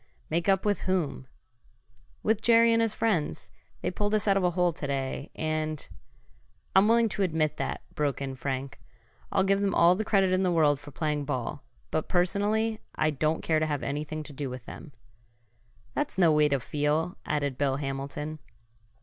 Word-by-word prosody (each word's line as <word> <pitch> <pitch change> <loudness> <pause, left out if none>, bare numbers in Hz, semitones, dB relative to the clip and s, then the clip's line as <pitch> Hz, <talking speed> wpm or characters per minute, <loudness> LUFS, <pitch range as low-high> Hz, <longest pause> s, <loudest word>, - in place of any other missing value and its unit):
"Make 170 +3 +1
up 195 +1 +3
with 205 -1 0
whom?" 155 -8 -1 1.0
"With 220 0 +2
Jerry 230 0 +5
and 230 - +3
his 225 -1 +2
friends. 205 -10 -1 0.3
They 180 - -1
pulled 205 +3 0
us 215 - 0
out 200 - +4
of 195 - +1
a 180 - +4
hole 175 0 +1
to 150 - -5
day, 135 0 -3
and 155 -1 -2 0.4
" - - -36
"I'm 190 +2 +6
willing 230 0 +5
to 205 - -3
admit 155 -4 +1
that," - - -3
broke 145 -2 -1
in 135 -1 -4
Frank. 130 -1 -4 0.5
"I'll 190 - +3
give 195 +1 +2
them 200 -2 +1
all 170 +1 +6
the 205 +4 -1
credit 195 -3 +2
in 185 - +2
the 185 -2 +2
world 150 -4 +3
for 145 +1 -11
playing 150 0 -2
ball, 130 -5 -3 0.3
but, 155 - -1
personally, 205 +5 +1 0.2
I 155 0 +2
don't 155 +2 0
care 160 -1 +2
to 155 - 0
have 145 -3 -2
anything 150 +2 -3
to 150 - -9
do 140 -1 -4
with 125 -1 -8
them." 155 - -10 1.0
"That's - - -2
no 175 -4 +5
way 150 -1 +4
to 140 -2 +1
feel," 150 +7 -1
added 145 -3 -1
Bill 140 -2 +2
Hamilton. 140 +2 -4
155 Hz, 190 wpm, -28 LUFS, 145-190 Hz, 1.0 s, I'm